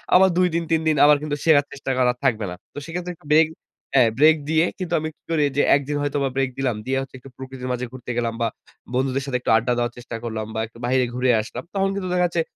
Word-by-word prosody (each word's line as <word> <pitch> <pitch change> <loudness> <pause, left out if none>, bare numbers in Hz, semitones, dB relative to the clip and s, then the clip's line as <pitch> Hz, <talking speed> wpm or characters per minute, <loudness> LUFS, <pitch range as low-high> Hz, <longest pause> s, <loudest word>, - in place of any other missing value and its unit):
আবার 190 +1 +7
২ 180 0 +4
দিন 170 - +1
৩ 160 -1 +3
দিন 155 - +3
আবার 150 0 +6
কিন্তু 150 -1 -2
শেখার 150 -3 +5
চেষ্টা 140 -1 -4
করা 125 -1 +3
থাকবে 115 -6 +1
না। - - -6 0.2
তো - - -13
সেক্ষেত্রে 175 +2 -5
একটু 150 - -19
ব্রেক 160 +1 +6 0.5
হ্যাঁ 125 -4 +5
ব্রেক 155 +2 +7
দিয়ে 160 +1 +3
কিন্তু 180 -2 -4
আমি 155 +1 -3
কি - - -52
করি 155 -2 +2
যে - - +5
১ 140 - +1
দিন 145 0 -1
হয়তো 145 0 -1
বা 135 - +1
ব্রেক 135 -1 +1
দিলাম। 130 -4 0
দিয়ে 135 +1 0 0.2
একটু 130 +1 -13
প্রকৃতির 130 -1 -7
মাঝে 125 0 -2
ঘুরতে 125 -1 -7
গেলাম 115 -1 0
বা 115 - +2 0.5
বন্ধুদের 130 +1 0
সাথে 135 -3 -1
একটু - - -3
আড্ডা 120 +2 +2
দেওয়ার 120 0 -1
চেষ্টা 120 -1 -7
করলাম 110 -2 -3
বা - - -1
একটু 115 - -18
বাইরে 130 +1 +2
ঘুরে 125 +1 +1
আসলাম। 110 - -7
তখন 195 -1 +1
কিন্তু 195 -2 -3
দেখা 180 0 +3
গেছে 170 -1 -1
135 Hz, 255 wpm, -22 LUFS, 125-160 Hz, 0.5 s, আবার